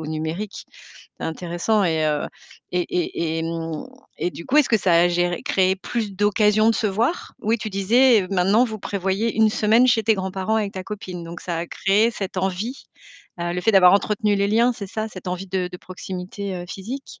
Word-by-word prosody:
au -, -, -6 dB
numérique. 160 Hz, +7 st, -4 dB, 0.5 s
C'est -, -, -5 dB
intéressant 175 Hz, +6 st, -1 dB
et 160 Hz, -2 st, +1 dB
heu 150 Hz, -1 st, 0 dB, 0.5 s
et 180 Hz, -, +1 dB
et 165 Hz, -2 st, -1 dB
hem 165 Hz, -1 st, -4 dB, 0.4 s
et 180 Hz, -, 0 dB
du 170 Hz, -, -9 dB
coup, 290 Hz, -, +1 dB
est-ce 300 Hz, -, +5 dB
que 225 Hz, -, +4 dB
ça 185 Hz, -4 st, +1 dB
a 175 Hz, +1 st, +5 dB
géré 175 Hz, +2 st, 0 dB
créé 190 Hz, -9 st, +2 dB
plus 215 Hz, +1 st, -3 dB
d'occasions 210 Hz, +2 st, +3 dB
de -, -, +1 dB
se 220 Hz, -3 st, 0 dB
voir? 230 Hz, -, -1 dB
Oui, 225 Hz, +2 st, +1 dB
tu 215 Hz, -1 st, -5 dB
disais 215 Hz, +2 st, +4 dB
maintenant, 195 Hz, +5 st, +3 dB
vous 220 Hz, -4 st, -5 dB
prévoyez 200 Hz, +3 st, -1 dB
une 220 Hz, -1 st, +5 dB
semaine 220 Hz, +4 st, +4 dB
chez 230 Hz, -3 st, +3 dB
tes 220 Hz, +1 st, +3 dB
grands-parents 190 Hz, +2 st, -2 dB
avec 205 Hz, -2 st, -1 dB
ta 185 Hz, -, -5 dB
copine. 185 Hz, -3 st, -7 dB
Donc 170 Hz, +1 st, -8 dB
ça 170 Hz, -2 st, -4 dB
a 170 Hz, -, -3 dB
créé 210 Hz, +7 st, +2 dB
cette 195 Hz, -4 st, -6 dB
envie? 190 Hz, +7 st, -3 dB, 0.6 s
Heu, 175 Hz, 0 st, -1 dB
le 180 Hz, -, -1 dB
fait 225 Hz, -, +3 dB
d'avoir 180 Hz, -2 st, +7 dB
entretenu 210 Hz, 0 st, +1 dB
les 200 Hz, 0 st, +1 dB
liens, 235 Hz, +3 st, +3 dB
c'est 200 Hz, -4 st, -8 dB
ça? 215 Hz, +2 st, -3 dB
Cette 185 Hz, -3 st, -8 dB
envie 180 Hz, +2 st, -4 dB
de 180 Hz, -1 st, -2 dB
de 180 Hz, -, -7 dB
proximité, 185 Hz, +2 st, -6 dB
heu, 175 Hz, -, -6 dB
physique? 245 Hz, +8 st, -7 dB
195 Hz, 205 wpm, -22 LUFS, 180-220 Hz, 0.6 s, d'avoir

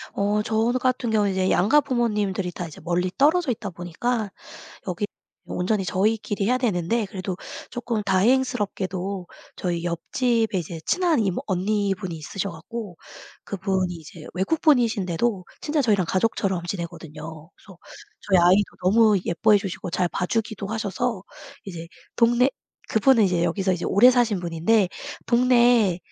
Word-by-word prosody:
어 205 Hz, +1 st, +1 dB
저 220 Hz, +2 st, +1 dB
같은 255 Hz, -2 st, 0 dB
경우는 210 Hz, -2 st, +2 dB
이제 190 Hz, 0 st, 0 dB
양가 220 Hz, +12 st, +4 dB
부모님들이 210 Hz, -8 st, -1 dB
다 175 Hz, 0 st, -6 dB
이제 155 Hz, -, -12 dB
멀리 175 Hz, +2 st, 0 dB
떨어져 310 Hz, +1 st, +3 dB
있다 215 Hz, -3 st, -4 dB
보니까 200 Hz, +6 st, -3 dB, 0.6 s
여기 180 Hz, +3 st, -2 dB, 0.4 s
온전히 195 Hz, +2 st, -1 dB
저희끼리 205 Hz, +2 st, 0 dB
해야 250 Hz, +3 st, +3 dB
되는데 220 Hz, -1 st, 0 dB
그래도 190 Hz, -1 st, -5 dB, 0.3 s
쪼끔 235 Hz, -3 st, -3 dB
다행스럽게도 200 Hz, -3 st, 0 dB, 0.3 s
저희 175 Hz, -2 st, -2 dB
옆집에 220 Hz, +5 st, 0 dB
이제 165 Hz, -1 st, -6 dB
친한 355 Hz, -5 st, +2 dB
이모 195 Hz, -4 st, -1 dB
언니분이 195 Hz, -1 st, -1 dB
있으셔 195 Hz, +6 st, -4 dB
갖고 190 Hz, +3 st, -8 dB, 0.5 s
그분이 190 Hz, -2 st, -1 dB
이제 160 Hz, -1 st, -11 dB
외국분이신데도 220 Hz, -, +1 dB, 0.2 s
진짜 300 Hz, -1 st, 0 dB
저희랑 205 Hz, -7 st, +2 dB
가족처럼 190 Hz, -2 st, 0 dB
지내거든요. 165 Hz, -3 st, -7 dB
그래서 190 Hz, -4 st, -16 dB, 0.4 s
저희 190 Hz, -2 st, +3 dB
아이도 180 Hz, +4 st, +5 dB, 0.2 s
너무 215 Hz, +2 st, +5 dB
예뻐해 205 Hz, +5 st, +3 dB
주시고 190 Hz, -2 st, -5 dB
잘 180 Hz, +1 st, 0 dB
봐주기도 210 Hz, +3 st, -2 dB
하셔서 220 Hz, 0 st, -2 dB, 0.4 s
이제 170 Hz, -4 st, -8 dB, 0.3 s
동네 240 Hz, +2 st, +4 dB, 0.4 s
그분은 225 Hz, 0 st, +4 dB
이제 180 Hz, -3 st, +1 dB
여기서 185 Hz, +3 st, 0 dB, 0.2 s
오래 235 Hz, +6 st, +7 dB
사신 235 Hz, -5 st, +2 dB
분인데 175 Hz, +4 st, +2 dB, 0.4 s
동네 240 Hz, -6 st, +4 dB
200 Hz, 335 characters per minute, -24 LUFS, 180-230 Hz, 0.6 s, 오래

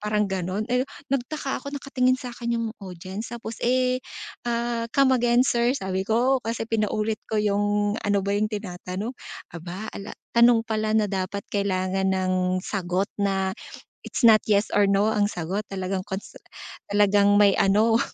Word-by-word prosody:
Parang 210 Hz, 0 st, +1 dB
ganun, 190 Hz, +1 st, -2 dB
eh, 250 Hz, -, +3 dB, 0.3 s
nagtaka 275 Hz, +1 st, -2 dB
ako 280 Hz, +2 st, -7 dB
nakatingin 255 Hz, -2 st, +1 dB
sa'kin 235 Hz, -2 st, -4 dB
'yung 230 Hz, -, -1 dB
audience 190 Hz, +4 st, -7 dB
tapos, 230 Hz, -1 st, -6 dB
eh, 255 Hz, +1 st, +2 dB, 0.5 s
ah, 235 Hz, 0 st, -1 dB
"come 275 Hz, -1 st, +5 dB
again 240 Hz, 0 st, +3 dB
sir" 240 Hz, -1 st, +2 dB
sabi 190 Hz, -4 st, -2 dB
ko, 250 Hz, +4 st, +3 dB
kasi 225 Hz, 0 st, -3 dB
pinaulit 215 Hz, -1 st, 0 dB
ko 220 Hz, -, -1 dB
'yung 205 Hz, 0 st, +1 dB
ano 205 Hz, -1 st, +1 dB
ba 200 Hz, -, 0 dB
'yung 210 Hz, +1 st, +1 dB
tinatanong, 200 Hz, +1 st, -5 dB, 0.4 s
aba, 175 Hz, +5 st, -7 dB
ala 200 Hz, +1 st, -7 dB, 0.2 s
tanong 235 Hz, 0 st, +6 dB
pala 215 Hz, -1 st, -1 dB
na 215 Hz, -, +3 dB
dapat 195 Hz, +1 st, -3 dB
kailangan 190 Hz, -1 st, 0 dB
ng 185 Hz, -1 st, +1 dB
sagot 190 Hz, 0 st, -1 dB
na, 195 Hz, -1 st, +1 dB, 0.5 s
it's -, -, -4 dB
not 220 Hz, -2 st, +8 dB
yes 205 Hz, 0 st, +2 dB
or 205 Hz, -1 st, +4 dB
no 200 Hz, +2 st, +3 dB
ang 205 Hz, -1 st, +2 dB
sagot 180 Hz, +1 st, -3 dB
talagang 190 Hz, 0 st, -3 dB
kons 190 Hz, +1 st, -5 dB, 0.6 s
talagang 205 Hz, 0 st, +4 dB
may 205 Hz, -1 st, +6 dB
ano. 220 Hz, +4 st, +4 dB
210 Hz, 155 wpm, -25 LUFS, 195-235 Hz, 0.6 s, not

